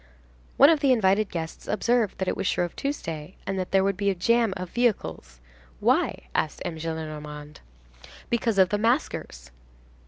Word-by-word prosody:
One 280 +4 +8
of 320 - +3
the 280 -2 +3
invited 210 -3 +3
guests 165 -2 -6
observed 230 0 +1
that 190 - -2
it - - 0
was - - -2
Shrove 175 -1 -1
Tuesday, 165 - -4
and 195 -1 -2
that 185 - -3
there 195 0 +3
would 195 -1 0
be 200 0 +1
a 195 - 0
jam 230 +4 +2
of 180 -1 -6
vehicles.—"Why?" - - -1
asked 155 - -1
M. 165 - -4
Gillenormand—"Because 150 - -5
of 190 -2 +5
the 205 - 0
maskers." 225 - -1
185 Hz, 155 wpm, -26 LUFS, 150-220 Hz, -, One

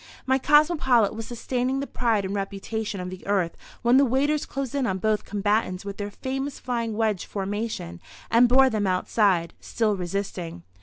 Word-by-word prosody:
My 265 0 +2
cosmopolite 290 - +4
was 225 0 -6
sustaining 250 +2 -2
the 280 - -2
pride 225 -6 0
and 190 - -3
reputation 200 +1 -3
of 180 0 -5
the 185 - -9
Earth 190 -4 +1 0.3
when 240 +2 +5
the 275 - +6
waiters 280 +4 +1
closed 270 -3 -4
in 275 -3 0
on 190 - -1
both 215 +2 0
combatants 205 -2 0
with 200 0 -6
their 205 0 -4
famous 270 +6 -4
flying 230 -3 -2
wedge 215 -5 0
formation 200 - -4 0.3
and 235 +1 +6
bore 265 +1 +6
them 210 -3 0
outside, 185 -2 +1
still 220 -3 0
resisting. 180 - -4
220 Hz, 170 wpm, -25 LUFS, 195-255 Hz, 0.3 s, the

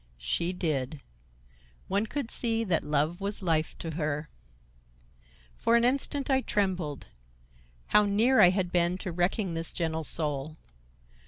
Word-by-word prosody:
She - - -1
did. 155 -5 -2 0.9
One 200 +3 0
could 275 -1 -4
see 230 -1 0
that 180 -7 +1
love 150 +5 0
was 200 0 0
life 160 -3 0
to 165 - -5
her. 150 -1 -2 1.3
For 230 - +2
an 235 0 +4
instant 275 +2 0
I 265 -2 +3
trembled. 185 - -2 0.8
How 210 0 +4
near 220 +6 +4
I 175 - +8
had 185 -1 -1
been 175 0 +2
to 185 -1 -5
wrecking 180 +2 0
this 165 0 -2
gentle 160 -2 -2
soul! 150 -1 -1
175 Hz, 140 wpm, -28 LUFS, 155-210 Hz, 1.3 s, I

